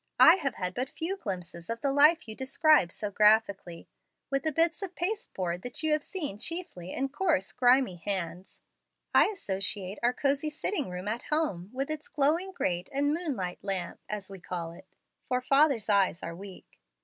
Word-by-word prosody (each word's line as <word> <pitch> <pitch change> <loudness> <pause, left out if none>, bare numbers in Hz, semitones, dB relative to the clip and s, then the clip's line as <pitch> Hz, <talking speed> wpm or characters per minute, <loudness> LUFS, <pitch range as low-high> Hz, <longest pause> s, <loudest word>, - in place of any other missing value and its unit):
"I 330 +3 +9
have 275 -9 -2
had 180 -1 -3
but 255 +6 -3
few 345 +4 -3
glimpses 180 - -6
of 230 0 -3
the 280 - +1
life 300 +2 +5
you 220 - -6
describe 265 - +3
so 210 +1 -4
graphically. 200 -5 +2 0.4
With 275 0 +1
the 315 - 0
bits 330 +5 +1
of 375 -2 -5
pasteboard 195 - -2
that 245 +7 -5
you 315 - +1
have 305 0 +2
seen 290 - -4
chiefly 330 - -3
in 270 +1 -1
coarse, 290 - 0
grimy 250 -6 +3
hands, 180 0 -5 0.5
I - - +7
associate 195 - -2
our 240 +1 +3
cosey 280 +3 0
sitting 300 - -2
room 180 +2 -6
at 225 +3 -2
home, 250 - -1
with 270 +3 -3
its 310 -1 -5
glowing 315 +7 +1
grate 180 - -2
and 285 +1 +1
'moon 325 -4 -2
light 180 -3 -5
lamp,' 190 -3 -3
as 210 -3 -4
we 195 - -9
call 175 -2 -5
it, 185 +3 -14 0.4
for 250 0 +1
father's 275 -2 +3
eyes 195 -4 +2
are 165 - -5
weak. 190 +1 -12
245 Hz, 185 wpm, -29 LUFS, 185-305 Hz, 0.5 s, I